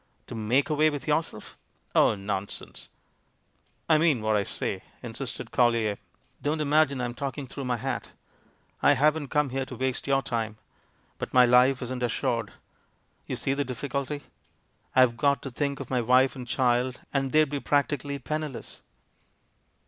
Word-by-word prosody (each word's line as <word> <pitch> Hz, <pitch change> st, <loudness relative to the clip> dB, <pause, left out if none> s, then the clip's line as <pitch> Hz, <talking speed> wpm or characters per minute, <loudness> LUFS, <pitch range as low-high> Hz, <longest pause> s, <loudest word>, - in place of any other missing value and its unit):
To -, -, -9 dB
make 120 Hz, +7 st, +1 dB
away 155 Hz, +1 st, +4 dB
with 145 Hz, -1 st, -5 dB
yourself? 150 Hz, -7 st, -2 dB, 0.4 s
Oh, -, -, +5 dB
non 100 Hz, -1 st, -2 dB
art 100 Hz, -, -13 dB
sense -, -, -9 dB, 1.0 s
I 155 Hz, -1 st, +5 dB
mean 150 Hz, -9 st, +3 dB
what 110 Hz, 0 st, +2 dB
I 105 Hz, -, +2 dB
say," -, -, -2 dB, 0.2 s
insisted -, -, -6 dB
Collier; 115 Hz, -4 st, +2 dB, 0.4 s
"don't 150 Hz, +2 st, 0 dB
imagine 150 Hz, -2 st, +3 dB
I'm 120 Hz, -1 st, -2 dB
talking 140 Hz, +2 st, -4 dB
through 135 Hz, +1 st, -6 dB
my 125 Hz, -1 st, 0 dB
hat -, -, -3 dB, 0.4 s
— -, -, -33 dB, 0.3 s
I 145 Hz, -, +6 dB
haven't 150 Hz, +2 st, +2 dB
come 150 Hz, 0 st, +1 dB
here 135 Hz, +1 st, -1 dB
to 125 Hz, -, -7 dB
waste 130 Hz, +2 st, -2 dB
your 135 Hz, -1 st, +2 dB
time. 110 Hz, -3 st, -2 dB, 0.6 s
But -, -, -5 dB
my 125 Hz, -1 st, +8 dB
life 125 Hz, +2 st, +4 dB
isn't 125 Hz, 0 st, -4 dB
assured. 115 Hz, -2 st, -1 dB, 0.8 s
You -, -, -2 dB
see 135 Hz, -, 0 dB
the 145 Hz, +1 st, 0 dB
difficulty. 140 Hz, +2 st, -4 dB, 0.7 s
I've 125 Hz, -2 st, +5 dB
got 140 Hz, +2 st, +2 dB
to 135 Hz, -, -5 dB
think 140 Hz, +3 st, -2 dB
of 135 Hz, -2 st, -7 dB
my 125 Hz, -2 st, +2 dB
wife 130 Hz, +3 st, +4 dB
and 125 Hz, -2 st, -7 dB
child, 125 Hz, +1 st, +1 dB
and 135 Hz, -2 st, 0 dB
they'd 155 Hz, -2 st, +4 dB
be 145 Hz, -, -1 dB
prac 145 Hz, 0 st, +2 dB
tically 140 Hz, -1 st, -4 dB
penniless." 155 Hz, -4 st, -5 dB
130 Hz, 170 wpm, -27 LUFS, 120-145 Hz, 1.0 s, my